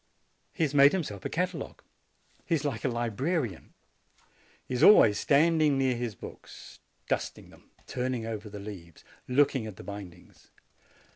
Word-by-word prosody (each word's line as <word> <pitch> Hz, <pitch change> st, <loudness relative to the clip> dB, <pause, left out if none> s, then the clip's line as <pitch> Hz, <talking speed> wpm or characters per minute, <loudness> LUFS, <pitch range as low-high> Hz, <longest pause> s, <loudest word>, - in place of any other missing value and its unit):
He 165 Hz, -, -2 dB
has 145 Hz, -2 st, 0 dB
made 140 Hz, 0 st, +6 dB
himself 125 Hz, -, -4 dB
a -, -, -1 dB
catalogue. 180 Hz, +3 st, -3 dB, 0.6 s
He 170 Hz, -, +2 dB
is 150 Hz, -1 st, -3 dB
like 135 Hz, -6 st, -3 dB
a -, -, +1 dB
libra 120 Hz, +2 st, -2 dB
88 180 Hz, -, +2 dB
JANUARY 130 Hz, -8 st, 0 dB
rian. 90 Hz, -, -14 dB, 1.0 s
He -, -, -5 dB
is 125 Hz, -, -1 dB
always 110 Hz, -, +7 dB
standing 155 Hz, -1 st, +3 dB
near 130 Hz, -2 st, +1 dB
his 120 Hz, -3 st, -4 dB
books, -, -, -12 dB, 0.3 s
dusting -, -, -3 dB
them, -, -, -20 dB, 0.2 s
turning 125 Hz, -2 st, -3 dB
over 110 Hz, -1 st, -5 dB
the 105 Hz, -, -8 dB
leaves, 95 Hz, -5 st, -10 dB, 0.2 s
looking 130 Hz, -3 st, +2 dB
over 105 Hz, -, -8 dB
the -, -, -11 dB
bind 100 Hz, -4 st, -8 dB
ings. 90 Hz, -, -22 dB
125 Hz, 170 wpm, -28 LUFS, 105-145 Hz, 1.0 s, always